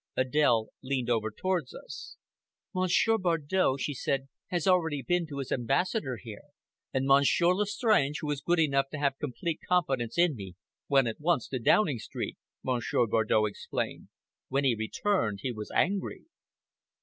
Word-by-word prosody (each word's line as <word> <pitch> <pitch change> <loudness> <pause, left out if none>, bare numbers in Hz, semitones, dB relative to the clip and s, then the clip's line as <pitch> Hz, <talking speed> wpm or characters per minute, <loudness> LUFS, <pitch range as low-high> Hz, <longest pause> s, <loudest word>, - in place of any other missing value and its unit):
Adèle 130 -4 +2
leaned 130 -2 -1
over 110 -2 +1
towards 170 - -2
us. - - -9 0.6
"Monsieur 185 +5 +2
Bardow," 165 -3 +1
she 145 +2 -2
said, 135 +1 -2 0.2
"has 175 -3 -1
already 160 -7 +2
been 175 +3 0
to 145 -2 -7
his 135 -2 -5
ambassador 135 - 0
here!" 110 -1 -10 0.5
"And 130 0 0
Monsieur 140 +6 +4
Lestrange, 210 - +2
who 150 - -3
is 145 -1 -3
good 175 +4 +1
enough 135 -3 +2
to - - -3
have 140 -2 0
complete 155 +3 -3
confidence 135 -10 +1
in 170 -4 +4
me, 95 -5 -8 0.3
went 135 -3 +4
at 115 - -4
once 160 -6 +1
to 130 - -2
Downing 145 - +3
Street," - - -5 0.2
Monsieur 120 -1 +1
Bardow 110 -1 +2
explained. 105 - -4 0.4
"When 135 +2 0
he 130 -3 +4
returned 110 - -1
he 130 - -1
was 110 -2 -7
angry!" 195 +2 0
140 Hz, 155 wpm, -29 LUFS, 125-175 Hz, 0.6 s, Monsieur